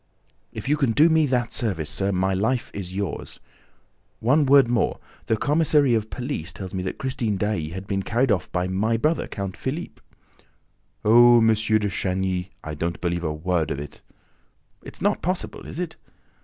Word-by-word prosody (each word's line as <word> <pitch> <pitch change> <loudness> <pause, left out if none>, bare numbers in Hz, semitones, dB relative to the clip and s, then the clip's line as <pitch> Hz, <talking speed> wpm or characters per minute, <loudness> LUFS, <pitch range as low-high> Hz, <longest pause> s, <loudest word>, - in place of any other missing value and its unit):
"If - - -7
you 150 +2 +2
can 135 -6 +1
do 155 +7 +5
me 160 -2 +3
that 125 -2 0
service, 95 - 0
sir, 100 +5 0
my 95 0 +1
life 115 +6 -1
is 95 -3 -5
yours!... 95 -3 -5 0.8
One 140 +5 +3
word 135 -2 +6
more: 120 -2 0 0.3
the 110 - +2
commissary 150 -1 +3
of 110 -1 0
police 125 - -4
tells 95 -2 -8
me 95 - -2
that 95 - -4
Christine 120 -6 -2
Daae 100 -6 -1
has 95 +3 -6
been 100 0 -2
carried 120 +5 +1
off 95 -4 -1
by 90 0 -1
my 105 +5 0
brother, 155 +8 0
Count 100 -2 -5
Philippe." 150 +7 -5 1.0
"Oh, 120 +2 +7
M. 115 -1 +5
de 110 -1 +2
Chagny, 95 -1 -1
I 75 - -5
don't 85 +3 -3
believe 85 -1 -2
a 80 - -1
word 80 0 -1
of - - -2
it." 75 +1 -9 0.8
"It's - - -10
not - - +1
possible, 180 +2 -3
is - - -8
it?" 175 -2 -4
110 Hz, 180 wpm, -24 LUFS, 95-130 Hz, 1.0 s, Oh